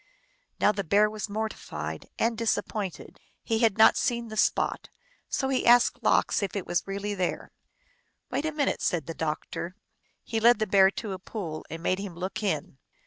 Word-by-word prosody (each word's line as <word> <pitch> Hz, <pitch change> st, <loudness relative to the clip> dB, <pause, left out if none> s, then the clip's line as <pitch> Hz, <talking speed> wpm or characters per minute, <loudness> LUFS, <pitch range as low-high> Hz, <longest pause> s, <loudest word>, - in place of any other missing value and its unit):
Now -, -, +5 dB
the 205 Hz, -1 st, -3 dB
Bear 205 Hz, +5 st, +3 dB
was 215 Hz, 0 st, -5 dB
mortified 220 Hz, +1 st, -5 dB
and 230 Hz, 0 st, +1 dB
disappointed. 215 Hz, -3 st, -3 dB, 0.2 s
He 225 Hz, -2 st, 0 dB
had 225 Hz, -3 st, +3 dB
not 220 Hz, -, +7 dB
seen 235 Hz, -1 st, -1 dB
the 215 Hz, -, -7 dB
spot, -, -, +1 dB, 0.4 s
so 265 Hz, -, 0 dB
he 265 Hz, -, +1 dB
asked 240 Hz, 0 st, +5 dB
Lox -, -, +2 dB
if 200 Hz, -, -3 dB
it 200 Hz, -, -3 dB
was 175 Hz, -, -1 dB
really 200 Hz, +1 st, -3 dB
there. 185 Hz, -3 st, -2 dB, 0.4 s
" -, -, -41 dB
Wait 295 Hz, -, -1 dB
a 315 Hz, -, 0 dB
minute," 295 Hz, -2 st, 0 dB
said 165 Hz, -5 st, 0 dB
the 165 Hz, -, -5 dB
doctor. 160 Hz, +3 st, -4 dB, 0.5 s
He 225 Hz, -, -2 dB
led 235 Hz, +1 st, +6 dB
the 215 Hz, -, 0 dB
Bear 195 Hz, -1 st, +5 dB
to 205 Hz, +1 st, -5 dB
a 190 Hz, -, -5 dB
pool 180 Hz, -6 st, -6 dB
and 165 Hz, +1 st, -7 dB
made 185 Hz, +1 st, +1 dB
him 195 Hz, -4 st, -6 dB
look 185 Hz, +4 st, -4 dB
in. 165 Hz, -6 st, -2 dB
205 Hz, 190 wpm, -27 LUFS, 185-225 Hz, 0.5 s, not